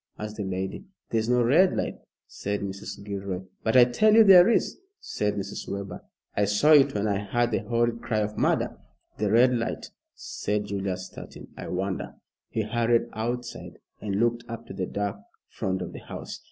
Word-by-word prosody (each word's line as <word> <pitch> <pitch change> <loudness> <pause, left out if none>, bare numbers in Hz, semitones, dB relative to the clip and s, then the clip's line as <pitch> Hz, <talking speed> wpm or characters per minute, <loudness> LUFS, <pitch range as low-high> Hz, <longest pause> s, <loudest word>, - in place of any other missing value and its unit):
asked 105 0 -6
the 105 - -2
lady. 95 - -4 0.3
"There 115 - +2
is 110 +1 -2
no 125 0 +4
red 165 +10 +4
light," - - -2 0.3
said 100 0 -4
Mrs. 100 +1 -6
Gilroy. 100 -2 -4 0.2
"But 110 +3 +3
I 125 - +10
tell 215 - +3
you 225 - +9
there 190 -1 +8
is," 235 - +1 0.2
said 105 0 -2
Mrs. 100 0 -5
Webber. 100 0 -5 0.3
"I 105 - +2
saw 105 +10 +3
it 140 -6 +6
when 105 0 0
I 100 -2 0
heard 120 +3 0
the - - +1
horrid 120 0 0
cry 110 - -2
of 105 0 -3
murder." - - 0 0.4
"The 105 -1 +1
red 125 +4 +5
light," 115 -1 -3 0.2
said 105 0 -3
Julius, 95 -2 -3
starting. 95 - -11
"I - - -7
wonder" 95 +1 -3 0.3
he 110 - -1
hurried 115 +2 +1
outside 120 +2 -4 0.2
and 100 -2 -2
looked 120 +2 +1
up 115 0 -7
to - - -9
the 95 -1 -3
dark 100 -1 -3 0.3
front 95 -1 -2
of - - -7
the - - -7
house. - - -8
105 Hz, 190 wpm, -26 LUFS, 100-120 Hz, 0.4 s, I